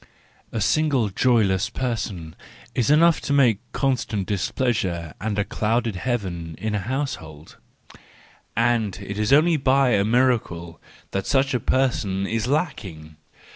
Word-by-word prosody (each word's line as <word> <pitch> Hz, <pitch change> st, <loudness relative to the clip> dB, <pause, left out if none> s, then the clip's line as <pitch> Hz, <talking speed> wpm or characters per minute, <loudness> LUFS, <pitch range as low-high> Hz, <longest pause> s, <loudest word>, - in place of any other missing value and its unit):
—A 115 Hz, -, -3 dB
single 135 Hz, 0 st, +2 dB
joyless 100 Hz, -2 st, +2 dB
person 105 Hz, -10 st, -4 dB, 0.4 s
is 120 Hz, -, 0 dB
enough 165 Hz, +2 st, +5 dB
to -, -, -4 dB
make 125 Hz, -8 st, +4 dB
constant 120 Hz, -7 st, -1 dB
displeasure 95 Hz, -5 st, -1 dB
and 105 Hz, 0 st, -2 dB
a 100 Hz, -, +1 dB
clouded 115 Hz, 0 st, -1 dB
heaven 90 Hz, -8 st, -3 dB
in 110 Hz, 0 st, -3 dB
a 105 Hz, -, 0 dB
household; 100 Hz, -, -5 dB, 1.0 s
and 115 Hz, -4 st, +1 dB
it 100 Hz, +1 st, -6 dB
is 105 Hz, +2 st, 0 dB
only 155 Hz, +3 st, +5 dB
by 135 Hz, -1 st, +3 dB
a 100 Hz, -4 st, +3 dB
miracle 110 Hz, -8 st, 0 dB, 0.3 s
that 95 Hz, 0 st, -3 dB
such 135 Hz, 0 st, +2 dB
a 125 Hz, -, +1 dB
person 110 Hz, -7 st, 0 dB
is 115 Hz, +2 st, -2 dB
lacking! 95 Hz, -, -3 dB
110 Hz, 135 wpm, -23 LUFS, 95-130 Hz, 1.0 s, enough